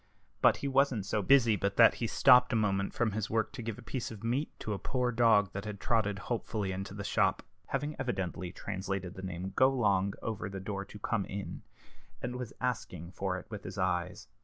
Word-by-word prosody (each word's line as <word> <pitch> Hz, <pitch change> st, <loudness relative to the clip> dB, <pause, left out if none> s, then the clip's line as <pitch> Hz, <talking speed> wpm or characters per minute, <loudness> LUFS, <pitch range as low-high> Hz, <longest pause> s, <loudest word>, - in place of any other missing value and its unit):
But -, -, +6 dB
he 140 Hz, -, -3 dB
wasn't 135 Hz, -6 st, +2 dB
so 105 Hz, +1 st, 0 dB
busy 120 Hz, -1 st, +5 dB
but 100 Hz, +1 st, -2 dB
that 115 Hz, -, +8 dB
he 115 Hz, -, -2 dB
stopped 125 Hz, +1 st, +6 dB
a -, -, +1 dB
moment 100 Hz, -3 st, +1 dB
from 115 Hz, -2 st, +1 dB
his 105 Hz, 0 st, -2 dB
work 110 Hz, 0 st, 0 dB
to 135 Hz, -, -7 dB
give 115 Hz, -2 st, -4 dB
a 125 Hz, -, -11 dB
piece 125 Hz, 0 st, -4 dB
of 110 Hz, -2 st, -10 dB
meat 125 Hz, +6 st, 0 dB
to 105 Hz, -, -2 dB
a 100 Hz, -, -4 dB
poor 125 Hz, -2 st, 0 dB
dog 115 Hz, -4 st, +4 dB
that 100 Hz, +1 st, -5 dB
had 105 Hz, -2 st, -5 dB
trotted 105 Hz, -4 st, +1 dB
hopefully 110 Hz, -4 st, -2 dB
into 95 Hz, +1 st, -5 dB
the 100 Hz, -, -5 dB
shop -, -, +1 dB, 0.2 s
(having 150 Hz, +1 st, -2 dB
evidently 95 Hz, -7 st, -3 dB
translated 95 Hz, -1 st, -4 dB
the 95 Hz, -, -8 dB
name 95 Hz, 0 st, -5 dB
"Golong" 105 Hz, -7 st, +3 dB
over 110 Hz, -2 st, -3 dB
the 95 Hz, 0 st, -6 dB
door 100 Hz, +1 st, -4 dB
into 100 Hz, +1 st, -10 dB
"Come 105 Hz, -1 st, -1 dB
in"), 100 Hz, 0 st, -6 dB, 0.6 s
and 125 Hz, 0 st, -4 dB
was 125 Hz, -3 st, -5 dB
asking 90 Hz, -9 st, -3 dB
for 95 Hz, -1 st, -2 dB
it -, -, -9 dB
with 105 Hz, -2 st, -6 dB
his -, -, -7 dB
eyes. 90 Hz, -2 st, -1 dB
105 Hz, 210 wpm, -31 LUFS, 95-120 Hz, 0.6 s, that